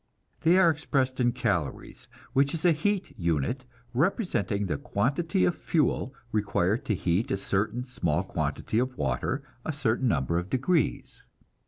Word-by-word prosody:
They 170 Hz, +3 st, +4 dB
are 180 Hz, -3 st, +6 dB
expressed 135 Hz, -5 st, -1 dB
in 120 Hz, -1 st, +3 dB
calories, 100 Hz, -, -2 dB, 0.3 s
which 140 Hz, +3 st, +3 dB
is 165 Hz, -, -3 dB
a 175 Hz, -, +7 dB
heat 190 Hz, +4 st, -1 dB
unit 85 Hz, -, 0 dB, 0.3 s
representing 120 Hz, -, 0 dB
the 95 Hz, -, -2 dB
quantity 145 Hz, +7 st, +1 dB
of 175 Hz, -, +2 dB
fuel 145 Hz, -5 st, 0 dB, 0.2 s
required 105 Hz, 0 st, +1 dB
to 105 Hz, -, +1 dB
heat 90 Hz, +4 st, 0 dB
a -, -, 0 dB
certain 105 Hz, +5 st, -1 dB
small 85 Hz, -, -1 dB
quantity 110 Hz, +3 st, -1 dB
of 125 Hz, +1 st, -1 dB
water 65 Hz, -2 st, -1 dB, 0.2 s
a -, -, -2 dB
certain 130 Hz, -3 st, 0 dB
number 85 Hz, -, +1 dB
of 90 Hz, +2 st, -6 dB
degrees. 150 Hz, +6 st, 0 dB
125 Hz, 150 wpm, -28 LUFS, 95-155 Hz, 0.3 s, a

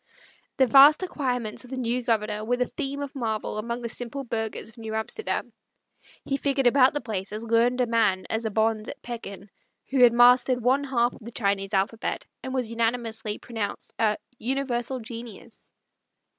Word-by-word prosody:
The 265 Hz, -, +5 dB
vast 280 Hz, +7 st, +7 dB
acquirements 250 Hz, -11 st, -2 dB
of 250 Hz, -, -13 dB
the 265 Hz, -, -5 dB
new 250 Hz, 0 st, -1 dB
Governor 215 Hz, -3 st, -1 dB
were 245 Hz, +3 st, 0 dB
the 250 Hz, -, +1 dB
theme 280 Hz, -1 st, -3 dB
of 280 Hz, -, -7 dB
marvel 220 Hz, -5 st, -3 dB
among 235 Hz, +2 st, -4 dB
the -, -, -2 dB
simple 245 Hz, +4 st, -4 dB
burghers 225 Hz, -4 st, -4 dB
of 225 Hz, -, -16 dB
New 220 Hz, -1 st, -5 dB
Amsterdam; 220 Hz, -, -3 dB, 0.7 s
he 275 Hz, -, 0 dB
figured 275 Hz, -1 st, 0 dB
about 260 Hz, +2 st, +5 dB
the 290 Hz, -, -1 dB
place 205 Hz, -5 st, -4 dB
as 215 Hz, +2 st, -5 dB
learned 230 Hz, +2 st, +2 dB
a -, -, +3 dB
man 215 Hz, -6 st, +1 dB
as 220 Hz, +1 st, -2 dB
a 220 Hz, -, -1 dB
Bonze 220 Hz, 0 st, 0 dB
at -, -, -8 dB
Pekin, 205 Hz, -4 st, -8 dB, 0.4 s
who 265 Hz, -2 st, +2 dB
had 245 Hz, -1 st, +8 dB
mastered 245 Hz, +1 st, +5 dB
one 265 Hz, +4 st, +3 dB
half 240 Hz, -3 st, +1 dB
of -, -, -14 dB
the 230 Hz, -, -7 dB
Chinese 200 Hz, -2 st, -1 dB
alphabet, 200 Hz, +4 st, -1 dB, 0.2 s
and 260 Hz, -, -6 dB
was 250 Hz, -4 st, -2 dB
unanimously 225 Hz, -2 st, -1 dB
pronounced 225 Hz, -4 st, -5 dB
a 215 Hz, -2 st, +2 dB, 0.2 s
"universal 260 Hz, 0 st, -1 dB
genius!" 230 Hz, 0 st, -10 dB
235 Hz, 180 wpm, -26 LUFS, 220-255 Hz, 0.7 s, had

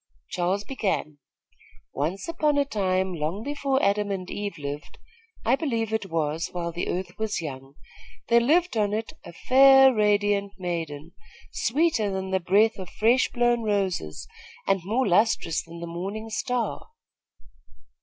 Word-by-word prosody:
Charles 185 Hz, +3 st, 0 dB
began: 195 Hz, -, -2 dB, 0.7 s
"Once 165 Hz, +7 st, -2 dB
upon 305 Hz, -3 st, +1 dB
a 285 Hz, -, +3 dB
time, 190 Hz, -6 st, 0 dB
long 165 Hz, +6 st, -3 dB
before 280 Hz, -1 st, 0 dB
Adam 205 Hz, +1 st, +2 dB
and 185 Hz, -2 st, -4 dB
Eve 205 Hz, -3 st, -4 dB
lived, 145 Hz, 0 st, -7 dB, 0.5 s
I -, -, +4 dB
believe 230 Hz, -7 st, -2 dB
it 220 Hz, -3 st, -1 dB
was, 160 Hz, 0 st, -1 dB
while 170 Hz, -1 st, -3 dB
the 170 Hz, +1 st, -3 dB
earth 180 Hz, +1 st, -4 dB
was 220 Hz, -1 st, -1 dB
young, 135 Hz, -3 st, -7 dB, 0.5 s
there 235 Hz, 0 st, +5 dB
lived 330 Hz, +8 st, +2 dB
on 210 Hz, -2 st, +1 dB
it 220 Hz, +1 st, -3 dB
a -, -, -10 dB
fair, 270 Hz, +6 st, +6 dB
radiant 205 Hz, -2 st, +1 dB
maiden, 165 Hz, -4 st, -4 dB, 0.4 s
sweeter 255 Hz, -4 st, +1 dB
than 190 Hz, -1 st, -3 dB
the 190 Hz, -, +2 dB
breath 200 Hz, +5 st, +3 dB
of 185 Hz, -2 st, -7 dB
fresh 235 Hz, +4 st, +2 dB
blown 240 Hz, -1 st, +1 dB
roses 195 Hz, -, -2 dB, 0.4 s
and 195 Hz, -1 st, +1 dB
more 230 Hz, +7 st, 0 dB
lustrous 190 Hz, -4 st, +2 dB
than 170 Hz, 0 st, -11 dB
the -, -, -4 dB
morning 195 Hz, +6 st, -5 dB
star. 245 Hz, +2 st, -2 dB
200 Hz, 145 wpm, -25 LUFS, 175-230 Hz, 0.7 s, fair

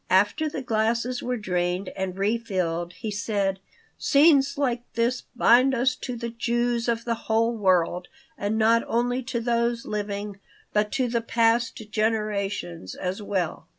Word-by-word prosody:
After 205 Hz, -, +3 dB
the 280 Hz, -2 st, -5 dB
glasses 235 Hz, +2 st, 0 dB
were 250 Hz, 0 st, -2 dB
drained 180 Hz, -2 st, -1 dB
and 190 Hz, -1 st, -3 dB
refilled 185 Hz, -5 st, -1 dB
he 215 Hz, +4 st, -5 dB
said: 200 Hz, -2 st, -1 dB, 0.4 s
"Scenes 280 Hz, -2 st, +4 dB
like 250 Hz, -4 st, 0 dB
this 235 Hz, +2 st, +1 dB
bind 255 Hz, +3 st, +5 dB
us 255 Hz, +1 st, +2 dB
to 250 Hz, -, -5 dB
the 235 Hz, 0 st, -5 dB
Jews 235 Hz, 0 st, 0 dB
of 230 Hz, 0 st, -1 dB
the 235 Hz, -, +1 dB, 0.2 s
whole 230 Hz, +1 st, +2 dB
world, 180 Hz, -3 st, +1 dB, 0.3 s
and 205 Hz, +2 st, -2 dB
not 225 Hz, +1 st, +4 dB
only 245 Hz, +2 st, 0 dB
to 245 Hz, -1 st, -3 dB
those 235 Hz, 0 st, 0 dB
living, 205 Hz, -1 st, -4 dB, 0.3 s
but 210 Hz, 0 st, +1 dB
to 255 Hz, -2 st, +1 dB
the 235 Hz, -1 st, 0 dB
past 230 Hz, -1 st, +1 dB
generations 205 Hz, -, -2 dB
as 185 Hz, +3 st, -3 dB
well. 190 Hz, -5 st, -2 dB
225 Hz, 150 wpm, -25 LUFS, 200-240 Hz, 0.4 s, bind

